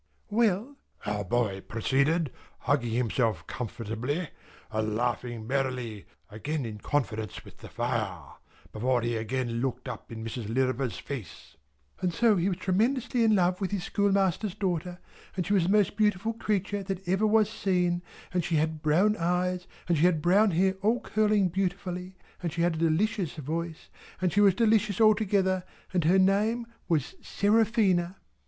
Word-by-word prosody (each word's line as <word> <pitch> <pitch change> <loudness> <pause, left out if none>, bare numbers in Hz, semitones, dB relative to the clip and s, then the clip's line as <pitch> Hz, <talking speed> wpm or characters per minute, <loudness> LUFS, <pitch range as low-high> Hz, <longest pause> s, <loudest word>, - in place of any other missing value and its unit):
"Well!" 225 +4 +1 0.3
our 105 0 -1
boy 100 -1 0
proceeded, 140 - +1 0.3
hugging 120 - +1
himself 115 -1 0
comfortably, 120 - -4 0.4
and 110 0 -1
laughing 120 -1 -2
merrily 125 -5 -2 0.2
(again 140 +6 -3
in 105 -2 -6
confidence 110 -7 -2
with - - -14
the - - -11
fire), 110 - -3 0.4
before 120 +2 0
he 120 0 0
again 115 +1 -2
looked 130 0 -3
up 125 -2 -7
in 110 -1 -6
Mrs. 115 -1 -5
Lirriper's 130 -4 0
face, 115 - -8 0.4
"and 180 - 0
so 225 +5 +3
he 180 +1 +1
was 180 - -2
tremendously 230 +6 +1
in 220 -1 +4
love 180 0 +2
with 190 - 0
his 200 -3 -2
schoolmaster's 200 -1 +1
daughter, 180 -2 -2 0.4
and 180 - 0
she 200 - 0
was 190 -4 +3
the - - 0
most 210 -1 +3
beautiful 210 +1 +1
creature 205 -2 -1
that 195 -1 -5
ever 190 +4 +2
was 215 -1 +4
seen, 180 -5 0 0.3
and 180 -1 +1
she 170 0 -1
had 155 0 0
brown 180 +8 +3
eyes, 180 +1 0 0.2
and 170 -3 +2
she 165 - +4
had 180 -3 +3
brown 195 +6 +4
hair 190 +2 +2
all 225 +5 +2
curling 215 -4 +2
beautifully, 180 0 -3 0.2
and 170 -3 -2
she 170 +2 -1
had 175 -1 +2
a 160 - -4
delicious 175 +2 +1
voice, 160 +2 -5 0.3
and 185 -2 0
she 205 - +4
was 195 -3 +5
delicious 215 -3 +2
altogether, 200 -4 +3 0.3
and 175 -4 +1
her 180 +4 +5
name 210 +5 +2 0.2
was 155 -6 0
Seraphina." 200 -4 +2
175 Hz, 160 wpm, -28 LUFS, 130-200 Hz, 0.4 s, was